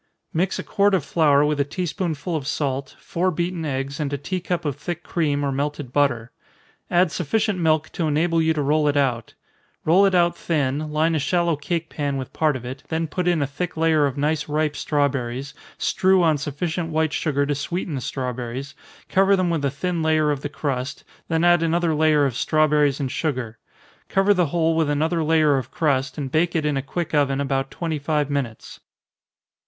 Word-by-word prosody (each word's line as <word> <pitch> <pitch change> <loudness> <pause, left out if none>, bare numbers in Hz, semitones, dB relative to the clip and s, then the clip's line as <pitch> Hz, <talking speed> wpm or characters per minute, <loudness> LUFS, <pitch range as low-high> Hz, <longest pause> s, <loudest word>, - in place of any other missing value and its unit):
_ - - -47 0.3
Mix 180 +4 0
a - - -4
quart 200 -1 +2
of 165 -7 -1
flour 150 -3 +3
with 150 -1 0
a - - +4
tea 160 +6 -4
spoonful 170 -2 -3
of 140 -4 -3
salt, 140 -3 -2
four 185 0 -1
beaten 175 0 -2
eggs, 135 -1 -3
and 145 -2 -2
a 145 - -1
tea 185 +7 -3
cup 175 -1 -3
of 145 -3 -1
thick 170 +3 -5
cream, 145 -4 0
or 140 - 0
melted 145 -1 -3
butter. 125 -5 +1 0.6
Add 175 -1 +3
sufficient 205 +4 0
milk 160 -1 +1
to 170 -4 -1
enable 165 +2 +2
you 160 0 +2
to 150 - 0
roll 150 +2 +2
it 145 0 +2
out 125 -5 0 0.5
roll 185 +5 +5
it 190 - +1
out 175 -1 +3
thin, 150 -2 -1
line 160 +2 +2
a 160 - +1
shallow 170 +4 +1
cake 165 +3 -3
pan 145 -3 -2
with 130 -2 -6
part 155 -3 +1
of 125 -1 -6
it, 130 +3 -6
then 160 0 -1
put 180 +3 -3
in 170 -4 +2
a - - +1
thick 160 +6 -5
layer 160 -2 +3
of 135 0 -5
nice 150 +1 0
ripe 150 0 0
strawberries, 140 -3 -1 0.2
strew 190 -1 +3
on 155 -3 +3
sufficient 160 +4 -3
white 160 -1 0
sugar 140 -2 0
to 145 - 0
sweeten 160 +4 -3
the 135 - -3
strawberries, 125 +1 -4 0.3
cover 195 +1 +4
them 185 -2 +1
with 160 -4 -1
a 140 - +2
thin 170 +5 -2
layer 155 -1 +2
of 140 -2 -2
the 145 - -4
crust, 140 -2 -3 0.2
then 160 0 0
add 175 -1 +5
another 165 0 +1
layer 150 -1 +3
of 130 -4 -1
strawberries 150 -1 +2
and 135 -3 -2
sugar 125 -8 -3 0.5
cover 195 +1 +4
the 180 -4 +2
whole 165 +1 +1
with 160 -2 +1
another 160 +3 +1
layer 155 -2 +3
of 130 -1 -7
crust, 135 -3 0
and 135 -3 -4
bake 165 +4 +1
it 155 -2 +1
in 150 -1 +1
a 135 - 0
quick 165 +4 -4
oven 140 -2 +2
about 135 -1 -1
twenty 160 -3 -3
five 150 0 0
minutes. 130 -6 -4
150 Hz, 210 wpm, -23 LUFS, 140-170 Hz, 0.6 s, roll